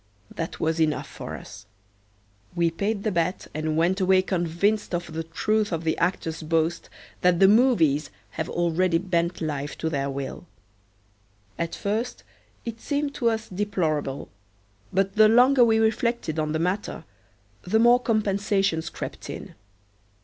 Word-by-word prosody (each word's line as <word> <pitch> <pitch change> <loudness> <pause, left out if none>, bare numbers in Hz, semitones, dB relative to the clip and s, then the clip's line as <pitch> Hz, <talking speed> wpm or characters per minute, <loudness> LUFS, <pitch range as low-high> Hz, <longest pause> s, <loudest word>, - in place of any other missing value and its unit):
That 165 - -5
was 160 +1 0
enough 155 -2 +1
for - - -7
us. - - -11 0.9
We 170 -1 +2
paid 200 +4 -2
the 215 - 0
bet 175 0 -1
and 155 +1 -2
went 180 +4 +2
away 185 0 +4
convinced 185 +3 0
of 175 -2 -5
the 165 0 -3
truth 210 +5 0
of 165 -1 -2
the 160 -1 +1
actor's 165 -2 -1
boast 165 +1 0 0.3
that 180 -1 +3
the 195 - +7
movies 195 - +4 0.2
have 160 - -4
already 175 0 +1
bent 170 -1 -1
life 145 -2 -3
to 160 - -2
their 140 -2 -1
will. 140 +5 -6 1.1
At 170 0 -2
first 220 +5 -3 0.4
it 230 -1 -6
seemed 285 -1 -1
to 235 -4 +1
us 225 0 -2
deplorable, 170 -8 -2 0.6
but 195 +2 0
the 215 0 +8
longer 250 +3 +6
we 225 -1 +4
reflected 220 -6 0
on 155 -1 -1
the 155 - 0
matter 180 +5 -2 0.6
the 200 +5 +1
more 240 +2 +6
compensations 200 -6 0
crept - - -7
in. - - -7
180 Hz, 150 wpm, -25 LUFS, 160-215 Hz, 1.1 s, the